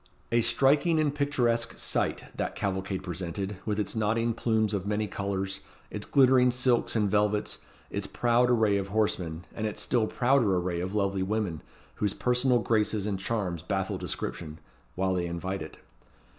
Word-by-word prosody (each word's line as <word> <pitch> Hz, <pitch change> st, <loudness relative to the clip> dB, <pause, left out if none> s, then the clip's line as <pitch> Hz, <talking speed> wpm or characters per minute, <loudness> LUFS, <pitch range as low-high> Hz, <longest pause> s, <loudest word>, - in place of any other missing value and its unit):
A 120 Hz, 0 st, +4 dB
striking 140 Hz, +7 st, +3 dB
and 150 Hz, -2 st, +1 dB
picturesque 120 Hz, -6 st, 0 dB
sight -, -, -1 dB
that -, -, -3 dB
cavalcade 95 Hz, -1 st, -2 dB
presented, 95 Hz, +2 st, -4 dB
with 105 Hz, 0 st, 0 dB
its 105 Hz, -, -2 dB
nodding 115 Hz, +2 st, +1 dB
plumes 110 Hz, -2 st, +1 dB
of 100 Hz, -1 st, -2 dB
many 105 Hz, +1 st, 0 dB
colours, 95 Hz, -1 st, -3 dB, 0.3 s
its 105 Hz, -1 st, -5 dB
glittering 130 Hz, -2 st, +5 dB
silks 125 Hz, -1 st, +2 dB
and 105 Hz, -2 st, +2 dB
velvets, 105 Hz, +1 st, +1 dB, 0.3 s
its -, -, -3 dB
proud 120 Hz, +1 st, +2 dB
array 110 Hz, -4 st, +3 dB
of 100 Hz, -1 st, -2 dB
horsemen, 90 Hz, -5 st, -1 dB
and 110 Hz, -1 st, -2 dB
its 105 Hz, -, -4 dB
still 115 Hz, -3 st, +1 dB
prouder 120 Hz, -7 st, +2 dB
array 90 Hz, -1 st, -1 dB
of 95 Hz, +3 st, -3 dB
lovely 100 Hz, -2 st, 0 dB
women, 95 Hz, -5 st, -1 dB, 0.4 s
whose 105 Hz, -2 st, 0 dB
personal 125 Hz, 0 st, +2 dB
graces 110 Hz, -2 st, +1 dB
and 100 Hz, -3 st, -2 dB
charms 95 Hz, -5 st, -2 dB
baffle 95 Hz, +1 st, -2 dB
description, 80 Hz, -2 st, -4 dB, 0.4 s
while 95 Hz, +1 st, +1 dB
they 90 Hz, -1 st, -1 dB
invite 85 Hz, +2 st, -4 dB
it. 80 Hz, -1 st, -8 dB
105 Hz, 160 wpm, -28 LUFS, 95-120 Hz, 0.4 s, glittering